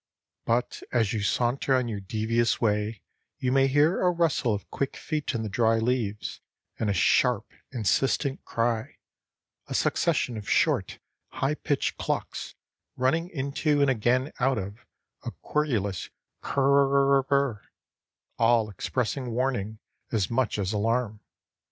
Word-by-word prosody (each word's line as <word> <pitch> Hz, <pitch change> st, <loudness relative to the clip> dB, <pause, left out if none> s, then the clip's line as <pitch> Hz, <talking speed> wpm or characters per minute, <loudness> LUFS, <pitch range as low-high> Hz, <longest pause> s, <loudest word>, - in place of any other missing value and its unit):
But 120 Hz, +1 st, 0 dB
as 115 Hz, -4 st, +1 dB
you 110 Hz, -, -1 dB
saunter 125 Hz, +6 st, +1 dB
on 130 Hz, -2 st, +1 dB
your 105 Hz, -3 st, -3 dB
devious 110 Hz, +4 st, 0 dB
way 105 Hz, -1 st, 0 dB, 0.3 s
you 125 Hz, -, -1 dB
may 135 Hz, 0 st, +4 dB
hear 145 Hz, +5 st, +3 dB
a 180 Hz, -, +4 dB
rustle 165 Hz, -8 st, +1 dB
of 105 Hz, -1 st, -3 dB
quick 140 Hz, -, -2 dB
feet 150 Hz, -4 st, -3 dB
in 115 Hz, -, -1 dB
the -, -, -3 dB
dry 115 Hz, +2 st, +2 dB
leaves 110 Hz, -3 st, -2 dB, 0.4 s
and 110 Hz, -, 0 dB
a -, -, +3 dB
sharp, 115 Hz, +4 st, +2 dB, 0.2 s
insistent 135 Hz, +4 st, 0 dB
cry, 115 Hz, -1 st, -1 dB, 0.7 s
a -, -, -4 dB
succession 120 Hz, -, +1 dB
of 105 Hz, -, -7 dB
short, -, -, +2 dB, 0.4 s
high 135 Hz, +2 st, 0 dB
pitched 145 Hz, -2 st, -1 dB
clucks -, -, -3 dB, 0.4 s
running 160 Hz, +7 st, +1 dB
into 145 Hz, 0 st, 0 dB
and 140 Hz, -1 st, +4 dB
again 125 Hz, +4 st, +1 dB
out 135 Hz, 0 st, +2 dB
of 100 Hz, +2 st, -5 dB, 0.4 s
a -, -, -3 dB
querulous 110 Hz, -, -1 dB, 0.3 s
"ker 140 Hz, -, -1 dB
r 140 Hz, 0 st, +4 dB
r 135 Hz, -, -3 dB
r," 140 Hz, -7 st, +1 dB, 0.8 s
all 115 Hz, -2 st, +3 dB
expressing 125 Hz, +6 st, -2 dB
warning 115 Hz, -3 st, -1 dB, 0.3 s
as 105 Hz, -4 st, 0 dB
much 120 Hz, -1 st, +1 dB
as 100 Hz, 0 st, -1 dB
alarm. 110 Hz, +1 st, 0 dB
120 Hz, 140 wpm, -27 LUFS, 110-135 Hz, 0.8 s, may